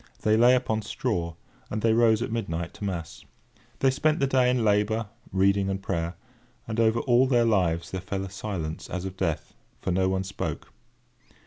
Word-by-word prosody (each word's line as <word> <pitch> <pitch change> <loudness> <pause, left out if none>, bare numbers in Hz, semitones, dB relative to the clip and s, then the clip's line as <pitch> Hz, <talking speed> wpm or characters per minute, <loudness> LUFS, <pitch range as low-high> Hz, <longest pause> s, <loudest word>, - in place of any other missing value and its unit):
They 110 0 +4
lay 120 +3 +6
upon 110 -3 0
straw, 90 -6 -2 0.3
and 105 0 -3
they 115 -1 +4
rose 115 -1 +4
at - - -4
midnight 85 -7 -3
to - - -10
mass. 85 -4 -4 0.6
They 135 - +5
spent 155 +4 +1
the 140 - +3
day 130 -2 +3
in 125 -2 +1
labour, 105 +1 +1 0.2
reading, 95 +1 +2
and 95 0 -2
prayer; 85 -3 -2 0.5
and 115 0 -3
over 115 +1 +3
all 125 0 +4
their 120 -3 +3
lives 90 -5 +1
there 95 - -3
fell 95 +1 -3
a - - -7
silence 95 -6 -5
as 90 +1 -4
of 95 -1 -5
death, 80 -5 -2 0.3
for - - -2
no 95 +1 +2
one 95 0 0
spoke. 95 +1 -5
105 Hz, 190 wpm, -26 LUFS, 95-115 Hz, 0.6 s, lay